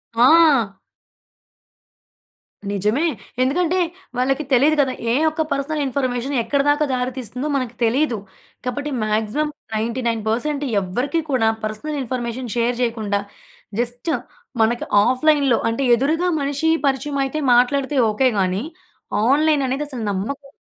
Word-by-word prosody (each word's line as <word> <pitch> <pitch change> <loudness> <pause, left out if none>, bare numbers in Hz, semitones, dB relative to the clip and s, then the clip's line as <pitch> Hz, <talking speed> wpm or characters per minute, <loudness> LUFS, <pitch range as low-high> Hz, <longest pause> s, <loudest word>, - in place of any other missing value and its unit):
ఆ! 255 -5 +5 1.9
నిజమే. 210 - +1 0.4
ఎందుకంటే 345 +7 +1 0.4
వాళ్ళకి 270 +4 +1
తెలియదు 285 +5 +5
కదా! 265 -2 0 0.2
ఏ - - +2 0.2
ఒక్క 315 +1 -3
పర్సనల్ 280 +2 -1
ఇన్ఫర్మేషన్ 260 0 -2
ఎక్కడి 280 +3 +1
దాకా 295 +1 +3
దారితీస్తుందో 250 +1 -3
మనకు 255 -3 -2
తెలీదు. 245 +2 +2 0.5
కాబట్టి 285 +4 -3
మాక్సిమం 220 +8 0 0.3
99% 230 +1 -1
పర్సెంట్ 280 +6 -1 0.2
ఎవ్వరికీ 245 - -1
కూడా 225 -4 +3
పర్సనల్ 245 +8 -3
ఇన్ఫర్మేషన్ 245 -1 -4
షేర్ 240 +1 +1
చేయకుండా 220 -4 0 0.6
జస్ట్ 245 +6 -2 0.5
మనకి 235 +2 +1 0.2
ఆఫ్‌లైన్‌లో 270 0 +3
అంటే 230 +4 -2
ఎదురుగా 310 +8 0
మనిషి 285 +3 0 0.2
పరిచయం 280 +1 0
అయితే 270 +3 -2
మాట్లాడితే 265 +4 +2 0.2
ఓకే 260 +5 +2
గానీ, 190 +3 0 0.7
ఆన్‍లైన్ 300 +1 +3
అనేది 270 +3 -1
అసలు 255 -5 -6
నమ్మక 275 +9 -4
260 Hz, 115 wpm, -21 LUFS, 235-290 Hz, 1.9 s, ఆ